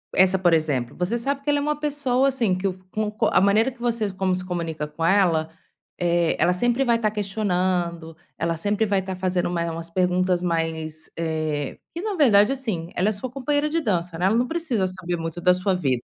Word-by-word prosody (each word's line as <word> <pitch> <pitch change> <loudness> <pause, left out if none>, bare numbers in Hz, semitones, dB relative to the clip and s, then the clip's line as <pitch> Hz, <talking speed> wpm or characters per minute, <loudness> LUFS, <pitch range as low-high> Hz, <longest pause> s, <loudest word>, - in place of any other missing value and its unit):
essa 190 0 +4
por 175 -2 +3
exemplo, 145 -7 0
você 180 +7 0
sabe 275 +3 -2
que 295 - -2
ela 290 - +2
é - - -2
uma 300 0 -1
pessoa 275 -3 +1
assim 235 -8 +1
que 190 +2 -1 0.2
com 215 -1 -1
co 215 - 0
a - - +5
maneira 210 +6 +3
que 250 - -19
você 235 -4 -1
como 190 0 0
se 185 - -4
comunica 165 -4 -3
com 150 +2 -4
ela, 170 -4 +3 0.5
eh, 170 -1 +2
ela 170 +2 +4
sempre 240 +7 +1
vai 240 -3 +3
estar 220 -2 0
questionando, 180 -5 -1 0.2
ela 165 0 0
sempre 205 +5 0
vai 200 -1 +2
estar 190 0 -4
fazendo 180 -1 0
uma 170 -1 -1
umas 165 +1 -6
perguntas 180 0 +1
mais, 160 -2 -2
eh, 155 -3 -2 0.2
que 340 - -5
na 420 0 -2
verdade 220 - +5
assim, 220 -12 -3
ela 190 +4 +2
é - - +1
sua 220 +5 -5
companheira 290 +3 0
de 330 +2 0
dança 180 - -1
não 175 - 0
é, - - +5
ela 220 - +2
não 245 +1 +1
precisa 270 - -1
saber 180 -1 -4
muito 165 +1 -5
da 180 +1 +4
sua 185 +1 0
vida. 130 -9 0
185 Hz, 220 wpm, -24 LUFS, 170-230 Hz, 0.5 s, a